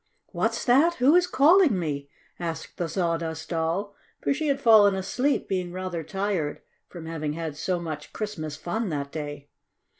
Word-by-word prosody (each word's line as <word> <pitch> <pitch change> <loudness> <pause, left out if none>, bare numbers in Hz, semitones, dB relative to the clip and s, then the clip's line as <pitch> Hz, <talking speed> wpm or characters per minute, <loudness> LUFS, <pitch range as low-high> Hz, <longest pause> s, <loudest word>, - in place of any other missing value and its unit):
"What's - - -1
that? 285 +8 +4
Who 265 +2 +4
is 360 0 +4
calling 320 - +5
me?" 145 -5 -3 0.3
asked 165 -2 -5
the 170 -2 -2
Sawdust 165 -2 -2
Doll, 170 +5 -1 0.3
for - - +1
she 305 +2 -2
had 275 -1 +1
fallen 215 -5 +6
asleep, 255 +9 0
being 180 -2 -2
rather 185 -2 -4
tired 185 -2 -2 0.3
from 170 -3 -9
having 155 -2 -3
had 160 -2 -4
so 180 +4 -1
much 155 -3 -6
Christmas 160 -9 -4
fun 215 +6 -2
that 140 -3 -3
day. 145 -2 -6
175 Hz, 160 wpm, -26 LUFS, 160-220 Hz, 0.3 s, fallen